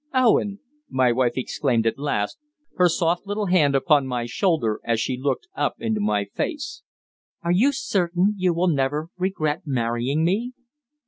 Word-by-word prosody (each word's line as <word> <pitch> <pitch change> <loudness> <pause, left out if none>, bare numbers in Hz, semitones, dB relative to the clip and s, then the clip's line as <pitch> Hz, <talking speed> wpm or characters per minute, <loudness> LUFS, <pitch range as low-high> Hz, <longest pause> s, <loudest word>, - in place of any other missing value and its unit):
"Owen," 215 -5 +3 0.3
my 130 -2 +3
wife 120 0 +1
exclaimed 130 -3 0
at 115 +3 0
last, 105 -8 -2 0.3
her 180 -1 +4
soft 170 +3 0
little 205 +1 -1
hand 160 -7 +3
upon 140 -1 +3
my 125 -2 -2
shoulder 120 - 0
as 115 -1 0
she 125 - -1
looked 135 - -2
up - - -1
into 220 -2 -1
my 105 - +1
face, 290 - -4 0.6
"are 170 - 0
you 225 +11 +4
certain 185 -6 0
you 185 -2 +1
will 170 +2 +1
never 150 +1 0
regret 180 -4 -1
marrying 125 +3 0
me?" 225 +8 0
160 Hz, 155 wpm, -23 LUFS, 130-195 Hz, 0.6 s, her